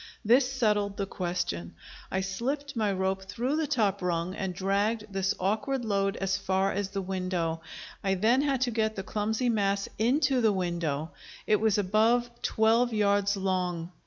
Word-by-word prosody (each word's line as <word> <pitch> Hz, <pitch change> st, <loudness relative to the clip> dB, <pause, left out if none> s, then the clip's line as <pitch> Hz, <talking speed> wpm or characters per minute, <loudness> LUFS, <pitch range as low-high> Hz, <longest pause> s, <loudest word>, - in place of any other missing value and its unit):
This 250 Hz, +4 st, +4 dB
settled 210 Hz, -6 st, +1 dB
the 200 Hz, -, -1 dB
question. 175 Hz, -, -3 dB, 0.3 s
I 190 Hz, -, -1 dB
slipped 270 Hz, +9 st, -3 dB
my 215 Hz, -3 st, +1 dB
rope 190 Hz, 0 st, -1 dB
through 240 Hz, +10 st, -2 dB
the 315 Hz, -1 st, 0 dB
top 210 Hz, -9 st, +1 dB
rung, 175 Hz, 0 st, -1 dB
and 190 Hz, -1 st, -3 dB
dragged 200 Hz, +4 st, 0 dB
this 195 Hz, 0 st, 0 dB
awkward 235 Hz, +7 st, -1 dB
load 195 Hz, -2 st, 0 dB
as 195 Hz, +1 st, 0 dB
far 190 Hz, 0 st, +1 dB
as 200 Hz, 0 st, -2 dB
the 195 Hz, -1 st, -3 dB
window. 180 Hz, -3 st, -2 dB, 0.4 s
I 195 Hz, -1 st, +1 dB
then 225 Hz, +8 st, +3 dB
had 275 Hz, -3 st, 0 dB
to 250 Hz, -2 st, +1 dB
get 220 Hz, -1 st, 0 dB
the 195 Hz, -, -4 dB
clumsy 220 Hz, +5 st, -1 dB
mass 200 Hz, -3 st, +1 dB
into 260 Hz, +3 st, +2 dB
the 220 Hz, -2 st, +4 dB
window; 170 Hz, -4 st, -2 dB, 0.3 s
it 210 Hz, -, +4 dB
was 220 Hz, -2 st, +3 dB
above 220 Hz, +5 st, +2 dB
twelve 230 Hz, +2 st, +3 dB
yards 200 Hz, -1 st, +2 dB
long. 180 Hz, -3 st, -1 dB
200 Hz, 165 wpm, -28 LUFS, 190-225 Hz, 0.4 s, This